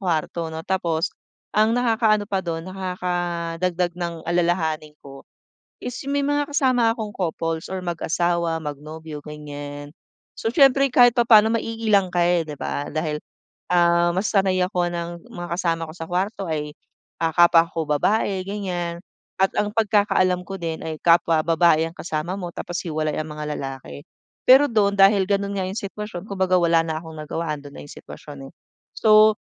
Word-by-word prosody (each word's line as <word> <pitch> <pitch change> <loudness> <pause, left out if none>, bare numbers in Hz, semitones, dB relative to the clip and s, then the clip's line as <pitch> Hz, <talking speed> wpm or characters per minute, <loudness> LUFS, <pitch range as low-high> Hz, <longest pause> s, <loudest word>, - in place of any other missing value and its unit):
kwarto 170 -2 -2
'no. 160 - -5
Tapos 170 -3 0 0.5
ang 215 +1 +4
nakakaano 225 -3 +2
pa 195 - 0
dun 165 -1 -4
nakakadagdag 180 -1 -2
ng 170 -1 -3
alalahanin 170 -3 0
ko 135 -1 -12 0.6
is 245 - -5 0.2
may 285 0 0
mga 290 0 0
kasama 255 -5 +3
akong 215 -2 -5
couples 165 -2 -3
or 190 0 -3
mag-asawa, 170 0 0
mag-nobyo, 150 +1 -7
ganyan. 145 -1 -8 0.5
So 225 - -1
siyempre 275 0 +5
kahit 245 -2 +6
papaano 225 -1 +6
maiilang 220 -4 +1
ka 175 - +2
eh, 175 0 +3
'di 150 - -6
ba, 145 - -3
dahil 155 -1 -2 0.5
ah 175 -1 +4
mas 195 +3 0
sanay 190 -3 +2
ako 180 -1 -1
ng 170 -1 -4 0.2
mga 175 0 -7
kasama 165 -2 0
ko - - -9
sa 165 - -6
kwarto 195 +2 -2
ay 150 -1 -3 0.5
ah, 165 -1 +1
kapwa 170 -1 +6
ko 165 - -3
babae 195 +6 +1
ganyan 180 -4 -3 0.4
at 190 - +4
ang 205 0 0
pagkakaalam 205 -4 +2
ko 195 - -5
din 165 -2 -4
ay 160 - -3
kapwa 165 -1 +4
babae 165 -1 +4
ang 165 - -18
kasama 165 +2 -3
mo 180 - -4
tapos 175 0 -4
hiwalay 155 -2 -2
ang 155 - -4
mga 150 0 -4
lalaki. 135 - -7 0.4
Pero 270 +3 +8
dun 205 -3 +2
dahil 195 0 +5
ganun 200 0 0
nga 190 - -1
yung 190 +3 -5
sitwasyon 200 -3 -7
kumbaga 190 -2 +1
wala 170 -1 +4
na 160 -1 -3
akong 160 -1 -10
nagawa, 155 +1 -3
andun 145 -1 -12
na - - -8
yung - - -12
sitwasyon 140 -2 -11
eh. - - -48 0.4
So 215 -1 +6
175 Hz, 165 wpm, -23 LUFS, 160-200 Hz, 0.6 s, Pero